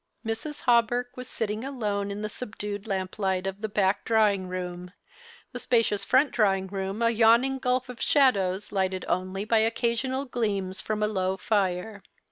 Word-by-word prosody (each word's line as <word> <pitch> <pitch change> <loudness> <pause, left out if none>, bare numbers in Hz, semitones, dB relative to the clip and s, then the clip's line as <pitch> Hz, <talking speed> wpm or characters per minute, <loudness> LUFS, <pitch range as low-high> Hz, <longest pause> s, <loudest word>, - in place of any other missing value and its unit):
Mrs. 225 +7 -4
Hawberk 245 0 +2
was 250 -1 -7
sitting 215 0 -3
alone 210 -7 -2
in 205 +1 -5
the - - -1
subdued 205 -2 -6
lamp 190 0 -3
light 190 -2 0
of 195 +1 -4
the 220 - -2
back 200 -1 +1
drawing 210 -4 +2
room, 180 0 -6 0.6
the - - -6
spacious 225 -4 +1
front 270 +1 +4
drawing 195 -4 +2
room 195 +3 -3
a 230 - +4
yawning 235 +4 +4
gulf 255 0 0
of 250 -2 -9
shadows 200 -9 +2
lighted 190 -2 -1
only 185 +2 -2
by 225 0 +3
occasional 235 +4 0
gleams 205 -7 -2
from 215 -1 -2
a - - +3
low 190 -2 -1
fire. 200 +1 -1
210 Hz, 165 wpm, -27 LUFS, 190-235 Hz, 0.6 s, front